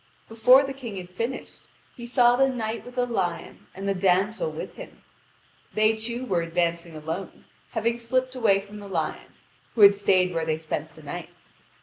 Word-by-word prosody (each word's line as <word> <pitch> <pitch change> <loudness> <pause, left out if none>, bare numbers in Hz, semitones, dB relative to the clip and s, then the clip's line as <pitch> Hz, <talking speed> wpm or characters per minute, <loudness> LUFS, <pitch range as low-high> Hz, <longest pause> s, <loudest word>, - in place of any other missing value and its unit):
Before 245 +4 +6
the 270 0 -4
King 240 -7 -7
had 180 -1 -8
finished, 230 +8 -5 0.3
he 240 -2 -8
saw 245 -1 +5
the 270 +1 +4
Knight 230 -3 -3
with 245 0 -12
the 250 -1 +1
Lion 190 -8 -3
and 195 +1 -5
the 200 - +2
damsel 190 +1 +1
with 155 - -7
him. - - -11 0.7
They 215 +1 +4
two 235 +3 -3
were 180 -7 +1
advancing 170 0 -1
alone, 160 +5 -6 0.3
having 230 +1 0
slipped 255 +2 0
away 215 -6 +3
from 205 +1 -11
the 200 - -9
lion, 165 -4 -3 0.4
who 225 - +1
had 200 0 +9
stayed 185 -3 +2
where 165 -1 -1
they 160 -1 0
spent 160 0 -5
the - - -14
night. - - -6
210 Hz, 185 wpm, -25 LUFS, 180-240 Hz, 0.7 s, had